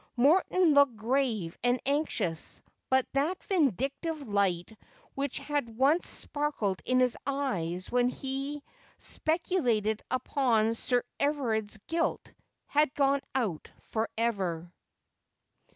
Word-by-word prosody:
Morton 335 +5 +4
looked 285 -4 +5
grave 220 -6 0
and 245 +1 +3
anxious; 275 - -1 0.3
but 260 -1 +3
that 300 +7 0
vindictive 285 - 0
light 200 -1 0 0.4
which 275 -1 -2
had 280 -7 -3
once 285 +7 +3
sparkled 285 -10 -2
in 255 0 +3
his 250 -2 +3
eyes 185 -11 -2
when 245 0 +3
he 275 +3 -4 0.3
speculated 250 - 0
upon 245 -4 +2
Sir 245 +1 0 0.2
Everard's 230 -8 0
guilt, 330 +1 -1 0.3
had 295 -1 +2
gone 280 -1 +3
out 210 -12 -1
for 225 0 -3
ever. 185 -7 -1
255 Hz, 105 wpm, -30 LUFS, 220-285 Hz, 0.4 s, looked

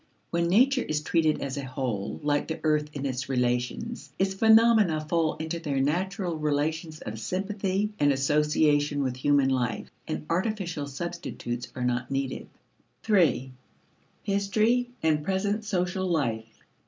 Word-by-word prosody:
When 170 0 +1
nature 255 +8 +4
is 150 -6 -2
treated 160 -1 +1
as 140 0 -4
a 140 - -3
whole, 130 -6 -3
like 145 0 +1
the 160 - -4
earth 150 -1 +2
in 140 -1 -4
its 130 -1 -3
relations, 125 - -1
its 190 0 +1
phenomena 220 -6 +5
fall 165 -1 +1
into 160 +1 -4
their 145 -5 -2
natural 175 +4 -1
relations 155 +2 -1
of 110 +1 -6
sympathy 195 - -1
and 145 -1 +4
association 145 +1 +2
with 130 -2 -1
human 140 0 +3
life, 125 -4 -1 0.2
and - - -4
artificial 175 -5 -1
substitutes 140 -5 -5
are 125 - -2
not 125 0 -1
needed. 135 -1 -3 0.6
3. 170 - +2 0.7
History 215 +5 +1
and 155 -2 +2
Present 200 +5 0
Social 185 -2 -1
Life. 115 -10 -2
155 Hz, 140 wpm, -27 LUFS, 135-190 Hz, 0.7 s, phenomena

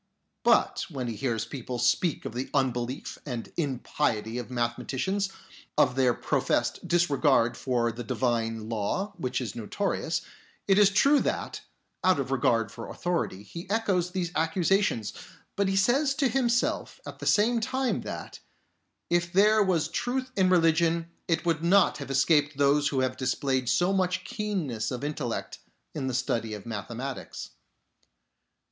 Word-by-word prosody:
But - - +3
when 130 -6 -4
he 115 - -3
hears 115 -2 -1
people 125 0 -5
speak 120 +8 +1
of - - -5
the 125 +2 -4
unbelief 125 -1 -1
and 120 -5 -6
impiety 125 -6 -1
of 120 - -7
mathematicians, 130 +11 -1 0.5
of 125 - +4
their 130 -2 +3
professed - - 0
disregard 145 -8 +3
for 120 -2 0
the 120 +2 -7
Divine 115 -2 -1
Law, 115 - -2
which 130 -6 -2
is 120 -6 -4
notorious, 160 - -2 0.4
it 195 0 +5
is 205 -1 +7
true 275 +9 +4
that, - - -2 0.4
out 185 -5 +4
of 135 -1 -3
regard 115 -4 +2
for 115 0 -8
authority, 170 - -2
he 170 - -9
echoes 200 -5 +1
these 180 -2 -2
accusations, 165 - +1 0.4
but 200 -1 +1
he 195 - 0
says 270 +8 +3
to 280 -2 +2
himself 240 -1 0
at - - -9
the - - -4
same 230 +3 +4
time 260 +3 -1
that, - - -7 0.7
if 175 0 +1
there 210 +3 +5
was 185 -6 +2
truth 255 +1 -2
in 190 -2 +3
religion, 165 -1 +3 0.2
it 165 0 0
would 165 -1 +1
not 185 0 +4
have 140 - -7
escaped 145 +1 +3
those 145 +1 +3
who 135 -2 0
have 130 0 0
displayed 130 -1 0
so 180 +7 +2
much 185 -1 0
keenness 185 - -2
of 125 +1 -5
intellect 145 -5 -3 0.3
in 140 -4 -3
the 130 - -1
study 115 -3 -1
of 105 - -10
mathematics. 115 +4 -6
145 Hz, 150 wpm, -28 LUFS, 120-185 Hz, 0.7 s, is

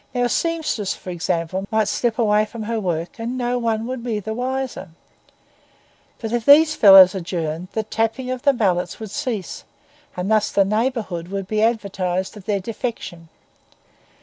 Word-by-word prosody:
Now 245 - +1
a 245 - +1
seamstress, 315 - -1
for 185 - -8
example, 175 +2 -2
might 220 -1 +1
slip 235 +2 -1
away 210 -3 +3
from 225 +1 -8
her 225 +1 -2
work 175 0 -3
and 235 +3 -3
no 245 0 -1
one 225 -1 -1 0.2
be 230 -3 -2
the 220 +2 -5
wiser; 255 -4 -4 1.3
but 225 -2 -5
if 240 -1 0
these 305 +4 +6
fellows 195 -3 +8
adjourned, 170 -2 -4
the 220 - -1
tapping 225 +4 -2
of 255 -1 -4
the 280 - +4
mallets 190 -8 -1
would 220 -3 -7
cease, 240 - -4 0.5
and 180 +4 -2
thus 215 -1 +2
the 195 - +3
neighbourhood 205 -5 -2
be 215 +1 -1
advertised 195 -4 -1
of 205 -3 -12
their 205 -1 0
defection. 195 -6 -6
215 Hz, 160 wpm, -21 LUFS, 190-240 Hz, 1.3 s, fellows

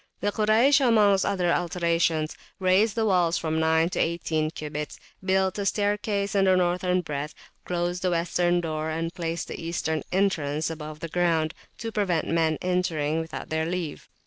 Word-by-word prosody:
The 205 - 0
Kuraysh, 225 +7 +4
amongst 210 -5 +4
other 180 -4 +1
alterations, 170 -2 0 0.2
raised 190 +3 +3
the 225 -1 +1
walls 180 -4 +2
[p.323] - - -4
from 160 -1 -1
nine 160 +1 +3
to - - -2
eighteen 160 -2 0
cubits, 150 -1 -6 0.2
built 190 +1 +1
a 200 - -2
staircase 205 0 0
in 195 -1 +3
the 185 -1 +5
northern 180 0 +1
breadth, 150 -2 -5 0.3
closed 175 0 -2
the 185 - +1
western 175 0 +1
door 155 -1 -3
and 165 +1 -3
placed 165 -1 -3
the - - -7
eastern 160 -1 -2
entrance 160 -6 0
above 155 -1 -7
the 165 - -3
ground, 165 -2 +1 0.2
to 225 0 -5
prevent 190 -7 0
men 160 -2 +1
entering 165 -4 0
without 160 0 -6
their 160 0 -1
leave. 170 -3 -4
175 Hz, 170 wpm, -26 LUFS, 160-190 Hz, 0.3 s, the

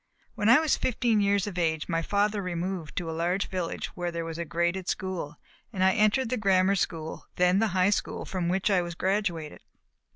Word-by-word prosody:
When 210 - +1
I 245 - +8
was 315 -2 +2
fifteen 235 -3 +1
years 200 -1 +2
of 190 -4 -4
age 160 -2 0
my 165 -1 0
father 205 +3 0
removed 180 -2 -4
to 175 - -3
a - - -3
large 175 +4 -1
village 180 -3 -3
where 175 -1 -2
there 170 -1 -4
was 165 0 -6
a 170 - -2
graded 175 +3 -1
school, 175 -5 -3 0.3
and 190 -4 -1
I 190 - +5
entered 220 +3 +2
the 255 - 0
grammar 195 -2 +3
school, 160 -4 -3
then 180 +2 +3
the 225 - +3
high 185 +2 +4
school - - -2
from 180 -3 -2
which 190 +3 +1
I 185 -2 +4
was 170 -1 -5
graduated. 185 -5 -2
185 Hz, 205 wpm, -27 LUFS, 170-205 Hz, 0.3 s, I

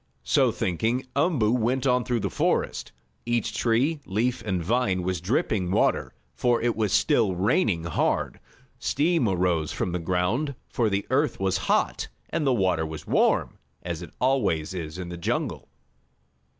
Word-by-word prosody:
So - - +3
thinking, 115 +9 -1
Umboo 140 -8 +2
went 125 +2 +1
on 125 -1 +3
through 120 -2 -1
the - - -2
forest. - - 0 0.3
Each 120 -3 -1
tree, 120 +8 +1
leaf 120 +5 0
and 95 -5 -1
vine 100 -2 +1
was 90 -1 -2
dripping 100 - 0
water, 95 - +1 0.2
for 120 -1 +1
it 120 0 0
was 110 -3 0
still 115 - +3
raining 95 - +1
hard. 85 -1 -1 0.4
Steam 150 - +1
arose 90 -4 +1
from 90 - -2
the 90 - -2
ground, 95 - 0
for 115 -3 0
the 100 0 -1
earth 145 +3 +1
was 95 -1 +1
hot - - +1 0.2
and 155 -3 0
the - - +4
water 95 -8 +1
was 80 -1 -6
warm, - - +1 0.2
as 85 -1 -4
it 85 - -8
always 125 - +1
is 85 -2 -5
in 90 -1 -6
the 85 - -6
jungle. 85 - -2
105 Hz, 160 wpm, -26 LUFS, 90-125 Hz, 0.4 s, the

